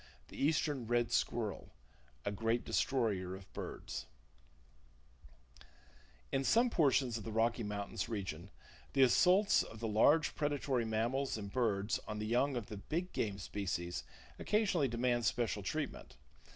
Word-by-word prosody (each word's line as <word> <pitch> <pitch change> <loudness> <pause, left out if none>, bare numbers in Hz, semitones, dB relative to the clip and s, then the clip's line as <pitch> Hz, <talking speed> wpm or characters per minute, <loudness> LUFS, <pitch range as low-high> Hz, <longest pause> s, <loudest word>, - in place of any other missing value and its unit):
THE - - -5
EASTERN 145 -5 +1
RED 120 0 +1
SQUIRREL 110 -4 -1 0.6
A - - 0
Great 115 +3 0
Destroyer 100 -8 0
of 95 0 -13
Birds 65 +1 -6 2.2
In 135 - +1
some 235 - +4
portions 130 - +2
of - - -8
the 110 - -5
Rocky 115 +2 +1
Mountain 105 -2 -4
region, 95 -4 -4 0.4
the 135 - +5
assaults 185 - +5
of 110 - -8
the 115 - -2
large 140 +9 +4
predatory 145 -5 0
mammals 115 +4 0
and 100 -2 -6
birds 105 -4 +1
on 105 - -4
the 105 - -3
young 125 +5 +2
of 115 - -3
the 105 - -7
big 170 - -3
game 100 -3 -1
species 90 -3 -3 0.4
occasionally 195 -9 +2
demand 120 0 0
special 110 -1 0
treatment. 150 +8 -4
115 Hz, 140 wpm, -35 LUFS, 105-140 Hz, 2.2 s, the